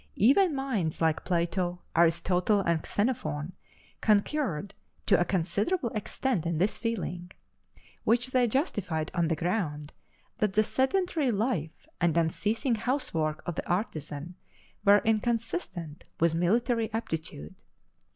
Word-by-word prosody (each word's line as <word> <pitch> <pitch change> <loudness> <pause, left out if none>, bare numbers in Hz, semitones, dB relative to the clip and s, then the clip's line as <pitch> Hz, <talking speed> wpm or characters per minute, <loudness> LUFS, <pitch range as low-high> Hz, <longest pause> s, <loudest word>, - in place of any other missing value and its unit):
Even 290 - +4
minds 230 - -1
like 160 -1 +1
Plato, 175 0 0 0.2
Aristotle, 175 +4 +3
and 170 -4 0
Xenophon 175 - -1 0.5
concurred 205 - +1 0.3
to 195 - +4
a - - +4
considerable 200 - 0
extent 215 -1 -1
in 170 -1 -1
this 195 +6 +1
feeling, 180 -6 -3 0.7
which 245 +3 +2
they 255 -2 +3
justified 200 - -1
on 170 -1 +1
the 165 - +1
ground 155 -4 -2 0.5
that 210 -2 +1
the 215 +1 +4
sedentary 285 - +1
life 200 - -2
and 170 -2 +2
unceasing 215 - +1
house 255 +5 -1
work 155 -1 -1
of 175 - -2
the - - -5
artisan 160 -4 -3 0.5
were 205 0 +6
inconsistent 220 - -1
with 165 0 +3
military 225 +7 +1
aptitude. 160 - -4
195 Hz, 120 wpm, -29 LUFS, 165-230 Hz, 0.7 s, were